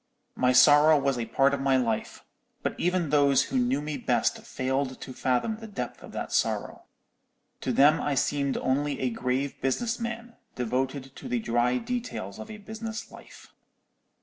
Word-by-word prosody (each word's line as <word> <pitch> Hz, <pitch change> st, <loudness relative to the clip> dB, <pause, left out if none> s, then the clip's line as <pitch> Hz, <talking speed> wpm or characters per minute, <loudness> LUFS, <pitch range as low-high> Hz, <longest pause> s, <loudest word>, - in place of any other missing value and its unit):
My 125 Hz, 0 st, +3 dB
sorrow 145 Hz, +4 st, +7 dB
was 135 Hz, -3 st, 0 dB
a 115 Hz, -, -3 dB
part 140 Hz, +1 st, +3 dB
of 140 Hz, -, -1 dB
my 135 Hz, -1 st, +3 dB
life: 115 Hz, -4 st, -2 dB, 0.4 s
but -, -, -1 dB
even 175 Hz, -3 st, 0 dB
those 140 Hz, -2 st, +4 dB
who 135 Hz, -, -3 dB
knew 130 Hz, +4 st, +1 dB
me 150 Hz, -1 st, -3 dB
best -, -, +1 dB
failed 130 Hz, 0 st, -2 dB
to 130 Hz, -, -8 dB
fathom 130 Hz, -, 0 dB
the 225 Hz, 0 st, -9 dB
depth 125 Hz, -, -6 dB
of -, -, -11 dB
that -, -, -5 dB
sorrow. -, -, -1 dB, 0.7 s
To 130 Hz, -, -2 dB
them 145 Hz, +6 st, +5 dB
I 145 Hz, -, 0 dB
seemed 140 Hz, +1 st, 0 dB
only 140 Hz, +2 st, 0 dB
a 130 Hz, -2 st, 0 dB
grave 130 Hz, +4 st, -2 dB
business 225 Hz, -, -1 dB
man, 235 Hz, 0 st, -5 dB, 0.2 s
devoted 130 Hz, +2 st, -2 dB
to -, -, -8 dB
the 125 Hz, -, 0 dB
dry 120 Hz, +2 st, +1 dB
details 230 Hz, -, -4 dB
of 110 Hz, -, -8 dB
a 215 Hz, -, -7 dB
business 220 Hz, +1 st, -7 dB
life. -, -, -14 dB
135 Hz, 175 wpm, -27 LUFS, 125-155 Hz, 0.7 s, sorrow